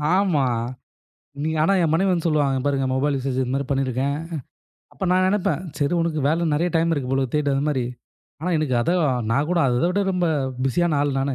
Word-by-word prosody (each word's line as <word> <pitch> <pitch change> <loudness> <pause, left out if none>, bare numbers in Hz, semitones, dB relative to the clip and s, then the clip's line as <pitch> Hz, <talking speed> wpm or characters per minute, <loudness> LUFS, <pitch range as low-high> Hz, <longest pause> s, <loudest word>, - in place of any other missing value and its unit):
ஆமா. 185 -7 +2 1.0
நீங்க 160 +1 -1
ஆனா 195 +5 +3
என் 160 - +1
மனைவி 190 +4 +2
வந்து 170 -2 -1
சொல்லுவாங்க, 145 -4 +1
பாருங்க 140 -2 +1
மொபைல் 140 +2 +1
யூசேஜ் 130 -1 -2
இது 130 -1 -1
மாரி 140 0 -1
பண்ணியிருக்கேன். 135 +1 0 0.8
அப்ப - - -5
நான் 185 0 +3
நெனப்பேன், 185 -4 0 0.2
சரி 145 +3 +1
உனக்கு 165 -2 -1
வேலை 165 +3 +1
நெறைய 170 +4 +1
டைம் 165 +1 +2
இருக்கு 135 -4 -3
போல 135 0 +2
தேடு 150 -1 +1
அது 135 - 0
மாரி. 130 -4 0 0.6
ஆனா 180 +3 -2
எனக்கு 150 -5 0
அதை 170 - +1 0.4
நான் 140 +6 +1
கூட, 180 - +2
அதை 125 +6 +1
விட 200 +3 0
ரொம்ப 180 -1 +1 0.4
பிஸியான 165 +2 +1
ஆள் 145 -2 0
நானு. 135 0 -1
150 Hz, 195 wpm, -23 LUFS, 135-170 Hz, 1.0 s, ஆனா